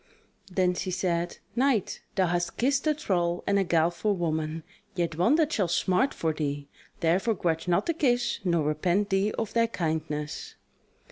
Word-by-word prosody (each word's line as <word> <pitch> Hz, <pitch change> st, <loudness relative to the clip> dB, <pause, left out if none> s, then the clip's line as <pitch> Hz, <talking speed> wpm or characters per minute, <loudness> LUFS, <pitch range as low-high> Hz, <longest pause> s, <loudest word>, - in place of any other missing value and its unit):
Then 180 Hz, 0 st, +2 dB
she 180 Hz, +1 st, -3 dB
said: 175 Hz, -2 st, -1 dB, 0.2 s
"Knight, 250 Hz, -5 st, +1 dB
thou 190 Hz, -, +3 dB
hast 175 Hz, 0 st, -1 dB
kissed 275 Hz, +4 st, +1 dB
a 305 Hz, -, +3 dB
thrall 175 Hz, -, 0 dB
and 200 Hz, 0 st, +2 dB
a -, -, +3 dB
guileful 175 Hz, +3 st, +1 dB
woman, 160 Hz, -2 st, -2 dB, 0.3 s
yet 170 Hz, -3 st, -1 dB
one 185 Hz, -, +4 dB
that 320 Hz, 0 st, +2 dB
shall 195 Hz, -4 st, +1 dB
smart 185 Hz, +9 st, +2 dB
for 160 Hz, -1 st, -1 dB
thee; 145 Hz, -2 st, -3 dB, 0.3 s
therefore 190 Hz, +7 st, +2 dB
grudge 165 Hz, -2 st, -1 dB
not 175 Hz, -1 st, +2 dB
the 335 Hz, -, +1 dB
kiss 245 Hz, -6 st, +1 dB
nor 170 Hz, -4 st, +2 dB
repent 175 Hz, +7 st, +1 dB
thee 195 Hz, +2 st, +2 dB
of 225 Hz, -2 st, -3 dB
thy 230 Hz, 0 st, +3 dB
kindness." 155 Hz, -6 st, -3 dB
180 Hz, 165 wpm, -27 LUFS, 165-215 Hz, 0.3 s, one